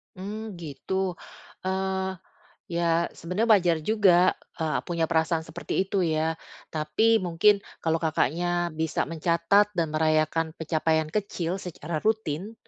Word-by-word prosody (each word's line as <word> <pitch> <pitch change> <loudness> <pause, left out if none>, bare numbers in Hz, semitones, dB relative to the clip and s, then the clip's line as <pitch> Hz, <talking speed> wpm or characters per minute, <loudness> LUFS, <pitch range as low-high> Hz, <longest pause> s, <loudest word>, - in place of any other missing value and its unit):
Mmm, 210 +2 -6
gitu. 180 +4 -3 0.5
Eee, 190 0 -1 0.6
ya, 170 0 +1
sebenarnya 180 +8 -2
wajar 175 -5 +5
juga, 185 -3 +4 0.2
eee, 160 -1 -1
punya 170 -2 0
perasaan 160 0 +1
seperti 165 +3 -2
itu 195 +1 -2
ya. 160 +1 0 0.3
Tapi 160 +9 +2
mungkin 185 +3 +3 0.2
kalau 165 0 +1
Kakaknya 175 +2 0
bisa 160 0 -1
mencatat 170 +6 +2
dan 165 -3 0
merayakan 155 +1 +1
pencapaian 160 -1 0
kecil 190 -3 -2
secara 170 -3 -5
rutin, 215 -1 -1
170 Hz, 120 wpm, -26 LUFS, 160-190 Hz, 0.6 s, wajar